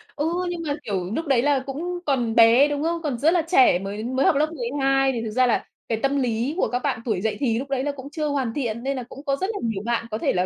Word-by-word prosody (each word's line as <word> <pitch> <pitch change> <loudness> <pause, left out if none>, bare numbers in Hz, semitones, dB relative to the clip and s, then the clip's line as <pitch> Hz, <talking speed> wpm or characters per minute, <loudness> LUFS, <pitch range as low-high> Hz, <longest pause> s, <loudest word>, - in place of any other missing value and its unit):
Ừ, 295 - -1 0.2
nhưng 345 -1 -4
mà, 285 - 0
kiểu, 190 -3 -3
lúc 325 - -2
đấy 265 -4 +3
là 285 0 +2
cũng 345 +6 -4
còn 245 -6 0
bé, 235 +5 +7
đúng 290 0 -2
không? 335 +1 -1
Còn 285 -7 -2
rất 315 +7 +3
là 350 - +3
trẻ, 360 - +5
mới 200 +3 -5
mới 260 +3 0
học - - +4
lớp 305 +2 +1
12 270 0 +1
thì 235 -3 -3
thực 225 - -4
ra 255 +3 +3
là 235 - +1 0.2
cái 225 - 0
tâm 275 +1 +2
lý 245 +2 0
của - - +2
các 245 - -1
bạn 225 - -1
tuổi 210 -6 -1
dậy 215 -1 -1
thì 235 -5 +1
lúc 275 - -6
đấy 270 -1 -1
là 290 - -1
cũng 280 0 -9
chưa 305 0 -2
hoàn 270 -6 -1
thiện, 235 -4 -3
nên 275 0 -1
là 250 - -4
cũng 275 +4 -12
có 275 -2 +1
rất 380 +8 -2
là 405 - -4
nhiều 225 -4 -2
bạn 235 -1 0
có 215 - -1
thể - - 0
là, 180 0 +1
265 Hz, 300 wpm, -23 LUFS, 230-290 Hz, 0.2 s, bé